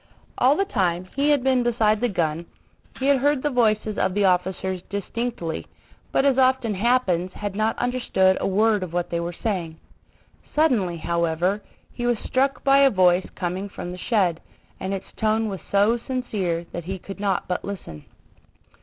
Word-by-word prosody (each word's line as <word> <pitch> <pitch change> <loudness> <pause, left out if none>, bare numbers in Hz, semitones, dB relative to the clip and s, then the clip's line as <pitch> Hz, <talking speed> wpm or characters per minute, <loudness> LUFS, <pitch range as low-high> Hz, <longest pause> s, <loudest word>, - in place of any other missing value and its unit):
All 260 +3 +5
the 395 - +2
time 185 - 0
he 280 +2 +2
had 290 -4 +3
been 260 -1 +3
beside 220 -3 +2
the 245 - +3
gun, 170 -3 -1 0.5
he 265 - -3
had 280 -1 +4
heard 285 0 +1
the 295 - +1
voices 215 -3 +1
of 185 - 0
the 205 -1 +3
officers 185 0 0
distinctly, 200 -3 -4 0.4
but 270 - +2
as 270 -1 +3
often 255 -4 +3
happens 190 -5 +1
had 205 -2 -5
not 215 +2 0
understood 240 -7 +2
a - - 0
word 210 +2 +2
of 180 -3 -5
what 175 0 -2
they 170 - 0
were 170 +1 -3
saying. 175 -7 -2 0.8
Suddenly, 230 - +2
however, 170 +4 0 0.3
he 240 -1 -3
was 240 -1 +2
struck 270 +5 0
by 275 0 +5
a 275 -1 +6
voice 185 -3 +3
coming 185 +3 -3
from 175 - -7
the 180 - -8
shed, 185 -8 +1 0.4
and 190 - -3
its 195 -1 -3
tone 220 0 +1
was 195 -2 -5
so 205 +4 +3
sincere 205 -10 -2
that 175 -1 -6
he 190 +2 -4
could 195 +2 -9
not 200 -3 -1
but 180 - -2
listen. 180 - -7
200 Hz, 180 wpm, -24 LUFS, 180-245 Hz, 0.8 s, a